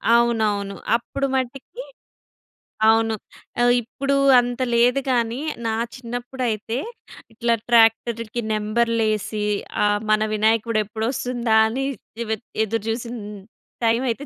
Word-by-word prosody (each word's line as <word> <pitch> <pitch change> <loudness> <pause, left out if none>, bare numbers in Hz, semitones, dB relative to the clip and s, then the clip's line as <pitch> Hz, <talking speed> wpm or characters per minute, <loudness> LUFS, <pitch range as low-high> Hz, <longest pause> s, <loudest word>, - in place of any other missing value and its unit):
అవునవును. 215 -4 +1 0.2
అప్పుడు 275 +3 -2
మట్టికి 265 - -4 1.0
అవును. 225 0 +4 0.5
ఆహ్, 245 0 +5
ఇప్పుడు 275 +4 -2 0.2
అంత 245 +1 -2 0.2
లేదు 245 +3 +4
గానీ, 235 0 0 0.3
నా 220 - 0 0.2
చిన్నప్పుడైతే 245 -2 -3 0.6
ఇట్లా 235 +1 +1 0.2
ట్రాక్టర్‌కి 230 0 +3
నంబర్‌లేసి 215 -1 0 0.4
ఆహ్, 205 0 +2
మన 215 0 +3
వినాయకుడు 220 +1 +2
ఎప్పుడొస్తుందా 235 +1 -1
అని 265 +4 -2 0.3
దివేద్ 220 -1 -3 0.2
ఎదురుజూసిన 225 +2 -3 0.7
టైమైయితే 235 +3 0
230 Hz, 95 wpm, -22 LUFS, 220-245 Hz, 1.0 s, ఆహ్